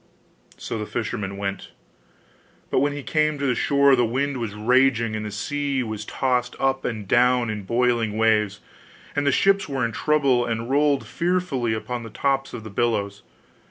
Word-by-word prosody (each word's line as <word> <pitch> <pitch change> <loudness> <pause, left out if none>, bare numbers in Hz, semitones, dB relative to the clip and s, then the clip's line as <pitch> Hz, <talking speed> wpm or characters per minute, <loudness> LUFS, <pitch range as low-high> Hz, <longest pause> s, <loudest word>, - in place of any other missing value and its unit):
So 115 - -5
the 105 - -4
fisherman 100 -4 -4
went. 100 -1 -4 1.0
But - - +3
when 145 +2 +2
he 145 -1 -6
came 155 0 +1
to 140 - -2
the 130 - +2
shore 140 +3 +4
the 125 - +2
wind 135 +4 -1
was 115 -4 -4
raging 115 0 +2
and 110 - -3
the 105 - -4
sea 140 +5 -2
was 110 -2 -5
tossed 125 -1 -1
up 135 0 +1
and 110 -4 -4
down 125 0 +3
in 105 -2 -6
boiling 115 -2 +1
waves, 105 -2 +2 0.5
and 145 0 0
the - - +5
ships 195 +4 +2
were 135 -3 0
in 115 - -2
trouble, 140 -3 +2
and 115 +1 -3
rolled 145 0 +2
fearfully 170 -10 -1
upon 120 +2 -4
the 115 - -8
tops 135 +2 -1
of 115 - -7
the 110 - -9
billows. 100 -3 -1
125 Hz, 180 wpm, -23 LUFS, 110-140 Hz, 1.0 s, the